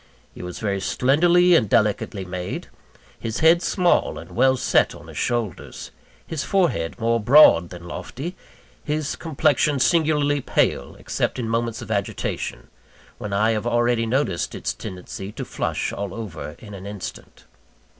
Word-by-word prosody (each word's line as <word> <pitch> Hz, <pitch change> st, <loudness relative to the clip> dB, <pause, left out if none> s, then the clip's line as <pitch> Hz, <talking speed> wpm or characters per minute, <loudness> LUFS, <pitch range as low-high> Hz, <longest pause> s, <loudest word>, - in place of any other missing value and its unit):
He -, -, -10 dB
was 90 Hz, 0 st, -6 dB
very 100 Hz, -3 st, -2 dB
slenderly 175 Hz, -, +4 dB
and 115 Hz, -, +4 dB
delicately 105 Hz, -1 st, +1 dB
made; 90 Hz, 0 st, -5 dB, 0.5 s
his 115 Hz, 0 st, -4 dB
head 165 Hz, +2 st, +6 dB
small, 180 Hz, -2 st, +2 dB
and -, -, -10 dB
well 130 Hz, 0 st, +3 dB
set -, -, +2 dB
on -, -, -13 dB
his -, -, -11 dB
shoulders 120 Hz, -8 st, -3 dB, 0.3 s
his 155 Hz, -3 st, -3 dB
forehead 160 Hz, -, 0 dB
more 115 Hz, +1 st, +2 dB
broad 110 Hz, -, +6 dB
than 85 Hz, -1 st, -10 dB
lofty 145 Hz, -, -6 dB, 0.5 s
his 150 Hz, -1 st, -2 dB
complexion 150 Hz, -2 st, +1 dB
singularly 150 Hz, -1 st, +2 dB
pale, -, -, 0 dB
except -, -, -2 dB
in 120 Hz, -3 st, -3 dB
moments 115 Hz, 0 st, -1 dB
of -, -, -8 dB
agitation, 100 Hz, -2 st, -3 dB, 0.5 s
when 105 Hz, -, -5 dB
I 105 Hz, +3 st, +2 dB
have 110 Hz, +1 st, -1 dB
already 120 Hz, -1 st, +2 dB
noticed 115 Hz, -8 st, -1 dB
its -, -, -3 dB
tendency 95 Hz, +2 st, -7 dB
to -, -, -5 dB
flush -, -, -2 dB
all 100 Hz, -2 st, -5 dB
over 100 Hz, -9 st, -7 dB
in 105 Hz, -2 st, -12 dB
an 100 Hz, 0 st, -8 dB
instant. 100 Hz, -3 st, -8 dB
115 Hz, 150 wpm, -23 LUFS, 100-145 Hz, 0.5 s, head